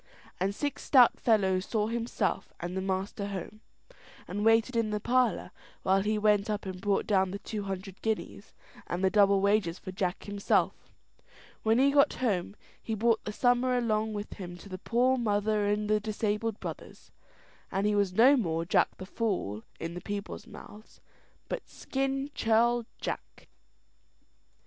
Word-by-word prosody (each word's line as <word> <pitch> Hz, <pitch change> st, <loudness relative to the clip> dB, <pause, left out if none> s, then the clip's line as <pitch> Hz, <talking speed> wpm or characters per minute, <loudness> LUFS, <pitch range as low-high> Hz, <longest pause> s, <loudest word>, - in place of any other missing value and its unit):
And 195 Hz, +2 st, 0 dB
six 290 Hz, +3 st, -3 dB
stout 255 Hz, -4 st, +5 dB
fellows 190 Hz, -5 st, +2 dB
saw 215 Hz, -2 st, 0 dB
himself 230 Hz, +1 st, -2 dB
and 175 Hz, +1 st, -5 dB
the 190 Hz, -, -1 dB
master 195 Hz, +1 st, -2 dB
home, 200 Hz, +2 st, -6 dB, 0.7 s
and 205 Hz, +3 st, -3 dB
waited 225 Hz, +2 st, +3 dB
in 230 Hz, -2 st, +1 dB
the 210 Hz, 0 st, -1 dB
parlour 245 Hz, +1 st, +1 dB, 0.3 s
while 190 Hz, +1 st, +3 dB
he 215 Hz, +2 st, 0 dB
went 210 Hz, -1 st, +2 dB
up 210 Hz, -1 st, -2 dB
and 185 Hz, -1 st, -6 dB
brought 200 Hz, -1 st, +1 dB
down 190 Hz, -3 st, +2 dB
the 195 Hz, -, -4 dB
two 205 Hz, 0 st, -5 dB
hundred 195 Hz, 0 st, -6 dB
guineas, 220 Hz, -1 st, -3 dB, 0.4 s
and 180 Hz, +2 st, -3 dB
double 200 Hz, -2 st, +4 dB
wages 200 Hz, -4 st, +2 dB
for 185 Hz, -, -8 dB
Jack 185 Hz, -1 st, -2 dB
himself. 205 Hz, -1 st, 0 dB, 0.7 s
When 225 Hz, +1 st, +3 dB
he 275 Hz, +2 st, +4 dB
got 280 Hz, 0 st, +4 dB
home, 200 Hz, -5 st, -1 dB, 0.3 s
he 225 Hz, -, -3 dB
brought 225 Hz, +1 st, +2 dB
the 210 Hz, -, -3 dB
summer 245 Hz, +2 st, +2 dB
along 220 Hz, -2 st, 0 dB
with 205 Hz, 0 st, -5 dB
him 175 Hz, -3 st, -8 dB
to 200 Hz, -, -13 dB
the 185 Hz, -1 st, -6 dB
poor 250 Hz, +5 st, +2 dB
mother 210 Hz, -1 st, +1 dB
and 210 Hz, +1 st, 0 dB
the 215 Hz, 0 st, +3 dB
disabled 215 Hz, +1 st, -2 dB
brothers; -, -, -8 dB, 0.6 s
and 195 Hz, +1 st, 0 dB
he 210 Hz, -, +2 dB
was 200 Hz, -2 st, +2 dB
no 245 Hz, +9 st, +6 dB
more 165 Hz, -9 st, -1 dB
Jack -, -, +2 dB
the 185 Hz, -, -7 dB
Fool 185 Hz, -, -2 dB, 0.2 s
in 165 Hz, +1 st, -4 dB
the 180 Hz, -, -6 dB
people's 205 Hz, +3 st, -6 dB
mouths, 215 Hz, 0 st, -13 dB, 0.5 s
but -, -, -5 dB
"Skin 270 Hz, +1 st, -2 dB
Churl 235 Hz, 0 st, +2 dB
Jack." -, -, -6 dB
210 Hz, 165 wpm, -29 LUFS, 195-230 Hz, 0.7 s, no